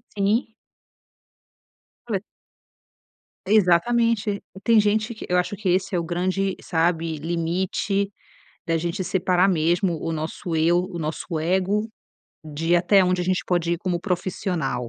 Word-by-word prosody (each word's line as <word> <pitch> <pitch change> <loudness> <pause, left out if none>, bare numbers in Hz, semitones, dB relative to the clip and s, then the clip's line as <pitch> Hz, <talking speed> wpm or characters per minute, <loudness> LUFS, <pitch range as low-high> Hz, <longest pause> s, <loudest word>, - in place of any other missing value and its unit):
Sim. 210 +3 +1 1.6
Olha... 195 -2 -1 1.2
Exatamente. 215 +2 +3 0.2
Tem 230 -2 +5
gente 215 +2 +1
que 220 - -8
eu 180 - +2
acho 180 +3 0
que 210 - -4
esse 185 +2 +1
é 175 - +2
o - - -2
grande, 185 +3 -1
sabe, 165 -1 0
limite 175 +5 -1 0.6
da 165 -1 +1
gente 170 +4 -2
separar 185 +1 +2
mesmo 170 0 +1
o 165 - -1
nosso 160 +2 -4
eu, 165 +2 +3
o 180 -2 -6
nosso 160 +2 -3
ego 190 +6 0 0.6
de 160 +3 0
até 190 +3 +4
onde 180 0 +1
a 180 - -1
gente 185 0 0
pode 170 -1 0
ir 170 - -1
como 180 -1 -1
profissional. 175 - -2
180 Hz, 135 wpm, -23 LUFS, 170-195 Hz, 1.6 s, Tem